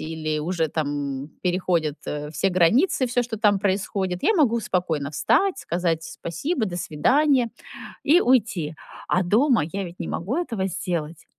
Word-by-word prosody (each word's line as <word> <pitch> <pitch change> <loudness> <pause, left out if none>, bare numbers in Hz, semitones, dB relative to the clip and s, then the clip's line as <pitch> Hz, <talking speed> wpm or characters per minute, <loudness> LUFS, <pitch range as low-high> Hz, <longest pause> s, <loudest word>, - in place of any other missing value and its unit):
или 155 -1 -3
уже 165 +1 -1
там 145 -2 -3
переходят, 175 -4 0
э, 150 0 -4
все 160 +5 0
границы, 220 - +3
всё, 245 +1 +1
что 235 -2 -5
там 205 -2 +3
происходит, 190 -2 -1
я 440 - +4
могу 260 - +3
спокойно 165 -8 -1
встать, 245 - +2
сказать 170 -2 -1
"спасибо, 220 - -3
до 175 -3 -5
свидания" 255 - +2 0.5
и 330 +5 +5
уйти. 205 - +1 0.3
А 185 - +2
дома 230 - +3
я 200 0 -3
ведь 175 -1 -9
не - - -4
могу 195 +10 -3
этого 225 - -2
сделать. 170 -3 -4
185 Hz, 155 wpm, -24 LUFS, 160-235 Hz, 0.5 s, и